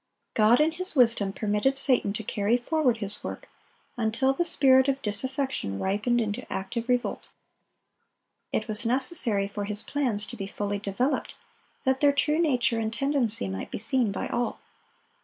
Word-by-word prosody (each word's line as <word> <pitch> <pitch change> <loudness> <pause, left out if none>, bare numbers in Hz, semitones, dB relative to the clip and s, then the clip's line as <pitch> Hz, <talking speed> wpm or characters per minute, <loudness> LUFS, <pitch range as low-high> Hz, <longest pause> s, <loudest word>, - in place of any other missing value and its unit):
God 220 +2 +4
in 310 +2 +3
His 370 +1 -2
wisdom 230 -6 +3
permitted 210 +7 0
Satan 255 -7 +3
to 220 - -4
carry 210 +3 0
forward 250 -1 0
his 210 -1 -2
work, - - -7 0.5
until 235 +4 +1
the 345 - 0
spirit 265 -5 +5
of 275 -1 0
disaffection 260 - -2
ripened 210 - 0
into 210 -3 -4
active 230 +5 -4
revolt. 245 -1 -1 1.2
It - - -1
was 215 0 +2
necessary 235 - +1
for 205 0 -5
his 210 +1 0
plans 245 -8 -1
to 240 - -8
be 195 -4 -6
fully 205 0 -3
developed, 215 +8 -2 0.5
that 265 0 +1
their 285 -1 +4
true 300 +2 +1
nature 250 -8 +1
and 220 -1 -2
tendency 245 - +1
might 95 0 -5
be - - -5
seen 230 0 +1
by - - -4
all. 240 - -2
235 Hz, 160 wpm, -26 LUFS, 210-270 Hz, 1.2 s, spirit